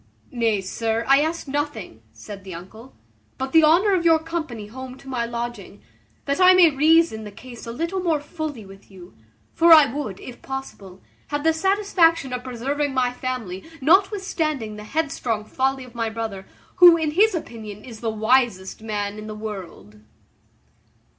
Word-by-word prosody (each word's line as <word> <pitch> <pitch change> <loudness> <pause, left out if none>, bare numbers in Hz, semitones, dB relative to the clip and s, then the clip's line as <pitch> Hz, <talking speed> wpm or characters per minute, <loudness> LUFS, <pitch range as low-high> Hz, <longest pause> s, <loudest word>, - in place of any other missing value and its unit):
"Nay, 230 -5 0
sir, 225 +4 -2
I 275 +1 +5
ask 320 +1 -2
nothing," 290 +2 -4
said 200 -2 -11
the 190 -3 -8
uncle, 220 +9 -12 0.4
"but 265 0 -4
the 320 -1 +6
honour 350 +7 +4
of 360 -3 +1
your 330 -1 +5
company 315 -9 -5
home 260 +4 -9
to 270 - -17
my 250 -3 -2
lodging, 235 - -6 0.4
that 280 +6 -1
I 370 0 +8
may 350 -3 +6
reason 305 -4 +3
the 210 - -7
case 240 +3 -12
a - - -4
little 335 +10 -3
more 335 -4 0
fully 295 - -6
with 195 +1 -15
you; 185 -2 -14 0.4
for 335 +1 +4
I 300 -6 +8
would, 245 -10 -5
if 245 - -11
possible, 205 -8 -8 0.2
have 290 -1 -3
the 320 0 +3
satisfaction 335 -6 +2
of 250 0 -4
preserving 270 +3 -3
my 250 -1 +1
family, 250 -8 -5 0.2
notwithstanding 320 - +1
the 210 0 -9
headstrong 245 -7 -2
folly 265 +3 -1
of 250 -2 -14
my 230 -2 -2
brother, 220 -4 -6 0.3
who, 350 -2 +9
in 315 -2 -1
his 400 +5 +3
own 330 - -2
opinion, 215 -2 -10
is 230 -4 -10
the 230 - -2
wisest 220 -3 +1
man 210 -1 -4
in 215 - -8
the 215 - -6
world." 195 - -8
255 Hz, 175 wpm, -23 LUFS, 215-315 Hz, 0.4 s, who